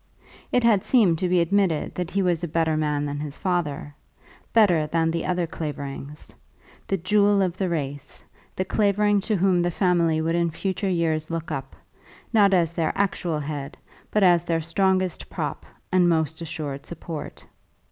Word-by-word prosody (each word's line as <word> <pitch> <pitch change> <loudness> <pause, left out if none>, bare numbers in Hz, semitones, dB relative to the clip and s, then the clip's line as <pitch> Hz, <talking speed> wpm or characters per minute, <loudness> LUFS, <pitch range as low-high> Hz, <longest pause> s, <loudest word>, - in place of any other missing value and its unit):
It 245 - +2
had 215 -5 +4
seemed 195 -11 +3
to 180 - 0
be 180 -1 +3
admitted 175 -2 +1
that 180 -1 -3
he 195 0 0
was 175 -2 0
a - - -1
better 160 0 +1
man 150 -1 0
than 145 0 -4
his 145 -1 -6
father, 150 -6 -2 0.6
better 180 -9 +4
than 165 +1 +1
the 165 - -2
other 180 -1 0
Claverings, 145 -2 -6 0.5
the 195 - 0
jewel 205 +3 +3
of 180 -2 -1
the 190 -1 -1
race, 145 -3 -5 0.3
the 185 - -1
Clavering 205 +1 +2
to 215 +2 -1
whom 185 -1 +3
the 175 - +1
family 170 -3 +2
would 165 +1 0
in 170 0 +1
future 190 +4 -2
years 160 -3 0
look 165 -1 -4
up, 135 0 -5 0.6
not 205 -3 +5
as 170 -3 +2
their 165 -2 0
actual 180 -5 -1
head, 145 +1 -5 0.3
but 210 - +2
as 175 -2 +5
their 165 -1 0
strongest 185 +2 0
prop - - -4 0.2
and 180 -1 +4
most 160 -1 0
assured 150 -4 -5
support. 165 -2 -7
170 Hz, 170 wpm, -24 LUFS, 155-190 Hz, 0.6 s, not